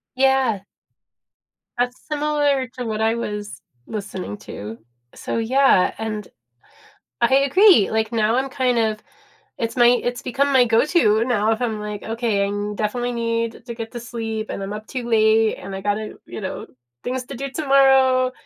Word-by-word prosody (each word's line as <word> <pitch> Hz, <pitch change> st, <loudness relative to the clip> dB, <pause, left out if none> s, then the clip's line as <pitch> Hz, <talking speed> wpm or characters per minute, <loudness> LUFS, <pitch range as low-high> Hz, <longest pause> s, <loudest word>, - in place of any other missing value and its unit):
Yeah. 265 Hz, -6 st, +2 dB, 1.1 s
That's 245 Hz, +1 st, -1 dB
similar 290 Hz, -3 st, +1 dB
to 250 Hz, -, -4 dB
what 220 Hz, -1 st, -3 dB
I 225 Hz, +1 st, +2 dB
was 210 Hz, -2 st, -5 dB, 0.3 s
listening 195 Hz, -, -5 dB
to. 105 Hz, +2 st, -8 dB, 0.4 s
So, -, -, -4 dB
yeah. 230 Hz, -4 st, +3 dB
And, 215 Hz, -2 st, -4 dB, 0.9 s
I 265 Hz, -, +4 dB
agree, 280 Hz, -, +5 dB
like, 220 Hz, +1 st, -1 dB
now 225 Hz, -1 st, +2 dB
I'm 265 Hz, +1 st, -1 dB
kind 255 Hz, -1 st, 0 dB
of 215 Hz, -1 st, 0 dB, 0.6 s
it's 230 Hz, 0 st, -3 dB
my 240 Hz, -1 st, +6 dB
it's 245 Hz, 0 st, +1 dB
become 280 Hz, +3 st, 0 dB
my 260 Hz, -2 st, +6 dB
go-to 230 Hz, -, +3 dB
now 220 Hz, -3 st, +1 dB
if 225 Hz, -, -2 dB
I'm, 225 Hz, -4 st, -2 dB
like, 210 Hz, -1 st, -6 dB
"Okay, 225 Hz, -3 st, -1 dB
I 205 Hz, +1 st, -3 dB
definitely 240 Hz, +4 st, -2 dB
need 230 Hz, -1 st, -2 dB
to 235 Hz, -, -6 dB
get 225 Hz, -1 st, -7 dB
to 240 Hz, -, -6 dB
sleep, 225 Hz, -2 st, -5 dB
and -, -, -5 dB
I'm 195 Hz, +1 st, -4 dB
up 215 Hz, +1 st, -7 dB
too 250 Hz, -2 st, -5 dB
late 220 Hz, -1 st, +3 dB
and 195 Hz, -, -8 dB
I -, -, -5 dB
gotta 205 Hz, +1 st, -2 dB
you -, -, -7 dB
know, 190 Hz, -2 st, -5 dB, 0.4 s
things 255 Hz, +1 st, -3 dB
to 270 Hz, -, -9 dB
do 275 Hz, +2 st, -5 dB
tomorrow. 265 Hz, -3 st, +4 dB
230 Hz, 165 wpm, -21 LUFS, 215-255 Hz, 1.1 s, my